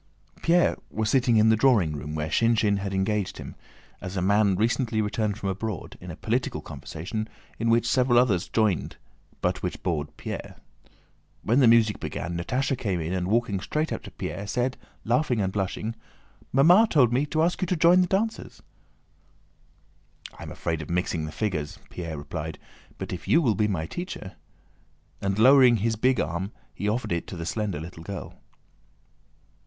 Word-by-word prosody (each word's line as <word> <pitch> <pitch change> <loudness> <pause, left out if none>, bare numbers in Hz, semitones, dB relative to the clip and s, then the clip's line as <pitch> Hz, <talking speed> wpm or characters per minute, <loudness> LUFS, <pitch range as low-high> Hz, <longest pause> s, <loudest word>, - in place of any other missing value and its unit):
Pierre 175 +1 +3
was 110 0 -1
sitting 125 -4 +3
in 110 +1 +5
the 110 - +5
drawing 110 - +3
room 75 +1 -5
where 75 0 -2
Shinshín 110 -1 +2
had 100 0 -3
engaged 100 +1 -1
him, - - -8 0.5
as 95 +1 -5
a - - +2
man 100 0 +3
recently 115 +2 0
returned 105 -1 -1
from 100 - -3
abroad, 100 0 -4
in - - -9
a - - -6
political - - -1
conversation 110 +7 -6 0.3
in 115 +1 +1
which 115 0 +3
several 125 0 +3
others 110 -8 +3
joined 105 - 0 0.4
but - - 0
which - - -4
bored 80 -5 -1
Pierre. - - -6 0.9
When 120 +5 +3
the 130 - +6
music 115 -2 +4
began 85 0 -4
Natásha 125 +11 -1
came 100 -7 -2
in 80 +2 -3
and 90 -1 -1
walking 110 -1 +1
straight 155 +11 -2
up - - -4
to - - -10
Pierre 100 +3 -5
said, 125 +4 0 0.3
laughing 125 +1 +1
and 95 -2 -1
blushing: 105 +3 -2 0.6
"Mamma 175 - +6
told 125 -6 +4
me 135 +4 +1
to 155 +2 +1
ask 175 +3 0
you 185 - 0
to 180 - +1
join 170 +2 +5
the 180 - +2
dancers." 220 +5 -2 1.7
"I - - -14
am - - -7
afraid 80 -1 -3
of 75 - -8
mixing 85 -2 -1
the 75 - -6
figures," 80 -7 -3
Pierre 85 -3 -5
replied; 75 +2 -5 0.4
"but - - -5
if - - -7
you 165 - +5
will 125 -9 +2
be 105 0 +1
my 90 -6 -2
teacher..." 175 - -6 0.9
And 100 0 -1
lowering 130 +1 +7
his 115 +2 0
big 125 +3 +2
arm 95 +5 -2 0.2
he 105 - -2
offered 115 0 -2
it 85 -1 -1
to 90 - -7
the 85 - -5
slender 100 -2 -2
little 80 +1 -9
girl. 95 +3 -8
105 Hz, 180 wpm, -26 LUFS, 90-125 Hz, 1.7 s, lowering